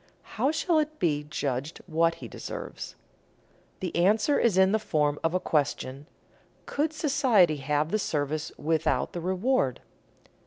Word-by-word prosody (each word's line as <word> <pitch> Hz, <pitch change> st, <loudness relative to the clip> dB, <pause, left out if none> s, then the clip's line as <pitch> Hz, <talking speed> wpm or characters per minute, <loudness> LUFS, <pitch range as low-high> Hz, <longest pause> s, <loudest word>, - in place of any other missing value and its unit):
How 250 Hz, +5 st, +1 dB
shall 320 Hz, +1 st, +2 dB
it 310 Hz, 0 st, -2 dB
be 150 Hz, -4 st, 0 dB
judged 140 Hz, 0 st, -3 dB
what 165 Hz, 0 st, +2 dB
he -, -, -9 dB
deserves? -, -, -7 dB, 0.9 s
The 180 Hz, -3 st, -3 dB
answer 210 Hz, -, +3 dB
is 220 Hz, -6 st, +2 dB
in 190 Hz, 0 st, +5 dB
the 220 Hz, -, +2 dB
form 150 Hz, -7 st, 0 dB
of 165 Hz, +2 st, +1 dB
a -, -, +3 dB
question, 145 Hz, -3 st, -1 dB, 0.6 s
Could 300 Hz, +2 st, -1 dB
society 245 Hz, -, +3 dB
have 145 Hz, +2 st, 0 dB
the 215 Hz, -, +1 dB
service 150 Hz, -3 st, -2 dB
without 160 Hz, +1 st, 0 dB
the 175 Hz, -, -4 dB
reward? 185 Hz, -, +1 dB
170 Hz, 145 wpm, -27 LUFS, 150-220 Hz, 0.9 s, in